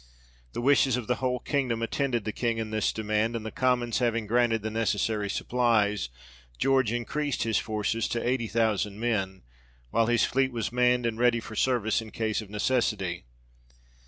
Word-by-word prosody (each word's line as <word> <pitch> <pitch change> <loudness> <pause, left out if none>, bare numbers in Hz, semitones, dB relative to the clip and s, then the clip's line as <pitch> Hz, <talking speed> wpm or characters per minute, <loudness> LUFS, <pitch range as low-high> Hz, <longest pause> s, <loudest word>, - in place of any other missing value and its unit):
The - - -3
wishes 135 -2 +4
of 125 - -4
the 125 +1 0
whole 125 0 0
kingdom 125 -4 -1
attended 120 -2 -1
the 110 - -1
King 115 +1 -1
in 110 -1 -3
this 110 -1 +1
demand; 110 +1 -1
and 110 -1 -4
the 110 - -4
Commons 125 -2 +1
having 115 -2 0
granted 115 0 +2
the 110 - -3
necessary 110 -1 0
supplies, 105 - +1 0.5
George 130 -4 +2
increased 130 +4 -2
his 115 -1 +1
forces 110 +1 -1
to 120 0 -2
eighty 125 -2 0
thousand 105 -2 0
men, 100 -5 -1 0.5
while 115 -1 +2
his 120 -1 +3
fleet 130 0 +1
was 115 -2 -3
manned 125 0 +2
and 115 -1 -2
ready 120 -1 +3
for 110 -1 -9
service 115 -3 +1
in 110 - -9
case 110 0 -2
of 105 - -11
necessity. 105 - -1
115 Hz, 175 wpm, -27 LUFS, 110-125 Hz, 0.5 s, wishes